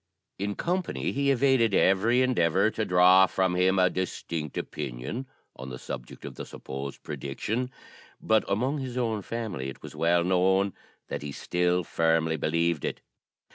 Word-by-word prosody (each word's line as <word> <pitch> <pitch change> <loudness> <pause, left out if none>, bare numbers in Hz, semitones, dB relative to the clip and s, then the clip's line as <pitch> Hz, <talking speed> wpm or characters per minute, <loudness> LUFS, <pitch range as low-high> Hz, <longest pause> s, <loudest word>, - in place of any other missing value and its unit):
In 100 +1 -2
company 180 +1 -1
he 140 +1 0
evaded 130 -5 +3
every 115 +7 +4
endeavour 100 -4 +2
to 110 - -2
draw 90 +1 +6
from 95 -1 0
him 95 +1 +3
a 90 -1 +5
distinct 85 -4 -4
opinion 65 - -5 0.3
on 65 +2 -8
the 65 - -6
subject - - -8
of - - -6
the - - -7
supposed 70 +1 -7
prediction; 110 - -3 0.5
but 110 0 +2
among 130 +9 0
his 130 -2 -5
own 115 -4 0
family 100 - -4
it 65 - -11
was - - -9
well 85 +1 +3
known 95 +2 +2 0.4
that - - -4
he 75 -1 -5
still 90 +4 0
firmly 80 0 +1
believed 85 +1 0
it. - - -3
95 Hz, 155 wpm, -27 LUFS, 85-115 Hz, 0.5 s, draw